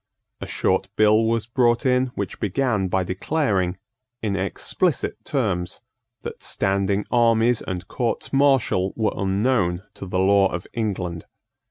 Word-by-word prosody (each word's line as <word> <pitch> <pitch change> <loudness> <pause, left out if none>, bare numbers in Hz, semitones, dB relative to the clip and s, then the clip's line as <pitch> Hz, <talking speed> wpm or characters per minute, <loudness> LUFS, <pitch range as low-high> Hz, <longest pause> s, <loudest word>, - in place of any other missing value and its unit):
A - - -6
short - - 0
bill 110 +1 +4
was 115 -1 0
brought 120 +2 +1
in 130 0 +3
which 100 -3 -4
began 105 -1 0
by 95 +1 0
declaring, 95 - -1 0.5
in 100 -3 0
explicit 120 - -1
terms, 95 -10 -2 0.4
that - - -7
standing 100 +1 0
armies 115 -1 +3
and 90 -1 -5
courts 120 +2 -2
martial 135 -9 +2
were 110 -2 0
unknown 95 -2 0
to 95 - -8
the 90 - -2
law 95 +1 +4
of 85 +1 -4
England. 95 -7 -3
105 Hz, 135 wpm, -23 LUFS, 95-120 Hz, 0.5 s, bill